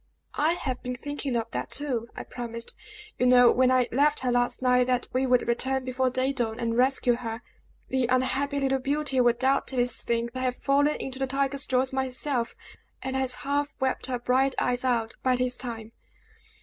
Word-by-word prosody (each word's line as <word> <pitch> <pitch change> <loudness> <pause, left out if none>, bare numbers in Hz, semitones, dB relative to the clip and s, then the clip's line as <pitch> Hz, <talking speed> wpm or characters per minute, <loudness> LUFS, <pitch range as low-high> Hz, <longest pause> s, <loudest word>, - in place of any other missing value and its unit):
"I 310 +3 +3
have 260 -7 -4
been 250 0 -4
thinking 285 0 -4
of 230 -1 -2
that, - - -3
too! 255 -6 -2
I - - -6
promised, 235 -1 -6 0.4
you 250 - +3
know, 245 -1 +7
when 255 0 +3
I 255 -1 +3
left 290 +4 +2
her, 250 -1 0
last 245 0 +1
night, 250 -1 +3
that 250 -1 0
we 260 +1 +1
would 250 -1 +2
return 260 +2 +1
before 255 0 0
day 260 +2 0
dawn, 235 -3 -2
and 230 -1 -1
rescue 255 0 +3
her. 230 -1 -6 0.5
The 260 -2 +1
unhappy 265 +3 0
little 270 -1 +1
beauty 275 0 0
will 240 -1 +4
doubtless 255 -1 +1
think 235 0 -1
I 255 - -4
have 255 -1 0
fallen 285 +3 +2
into 265 0 -5
the 270 - 0
tiger's 275 +1 0
jaws 260 0 +1
myself, 260 -1 -1 0.5
and 265 0 -3
has 260 -1 +1
half 285 +1 -1
wept 265 -1 -1
her 255 -1 -1
bright 260 +2 +1
eyes 250 0 0
out 235 -3 0
by 255 -1 +2
this 250 0 0
time!" 230 -3 -7
255 Hz, 190 wpm, -27 LUFS, 245-270 Hz, 0.5 s, know